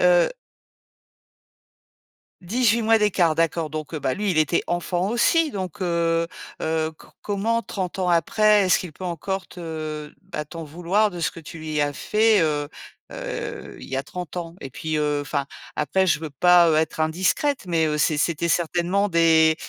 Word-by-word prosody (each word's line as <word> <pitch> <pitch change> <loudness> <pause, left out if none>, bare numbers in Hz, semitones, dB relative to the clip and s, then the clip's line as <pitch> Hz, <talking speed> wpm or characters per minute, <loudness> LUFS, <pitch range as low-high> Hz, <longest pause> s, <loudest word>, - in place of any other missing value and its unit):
Heu. 180 -1 +5 2.1
18 230 +4 +2
mois 225 +1 +4
d'écart, 180 -6 +2
d'accord. 165 -1 0
Donc 155 +1 -6
heu, 155 - -2
bah 130 - 0
lui, 205 -2 -1
il 160 - -1
était 155 +2 +2
enfant 175 +2 -1
aussi. 305 +7 +3
Donc 190 0 -5
heu 170 -1 +1 0.3
heu, 160 0 0
co 160 - -18
comment 220 +3 0
30 190 -2 -4
ans 180 -1 +1
après, 205 +5 +4
est-ce 185 - +4
qu'il 175 -5 -7
peut 185 - -10
encore 190 +3 -3
te 155 -3 -6
bah 155 -5 -5
t'en 165 +2 -8
vouloir 175 +7 +1
de 175 - -8
ce 165 - 0
que - - -11
tu 165 +1 -10
lui 155 -1 -2
as 145 0 0
fait 215 +3 +3
heu 150 -2 0 0.5
heu - - -6
il - - -10
y 135 - -3
a 135 - -1
30 180 +1 -7
ans? 170 0 -5
Et 135 - -6
puis 155 +4 -3
heu 150 -1 0
enfin, 140 -1 -2 0.3
après 190 +6 +1
je 170 - +2
veux 160 -1 -5
pas 175 +4 +5
heu, 155 - +3
être 160 0 0
indiscrète 185 - +1
mais 165 -2 +1
heu 150 - -1
c'est 150 0 +2
c'était 170 +2 0
certainement 175 +4 +1
des, 160 -2 +5
170 Hz, 185 wpm, -23 LUFS, 155-190 Hz, 2.1 s, Heu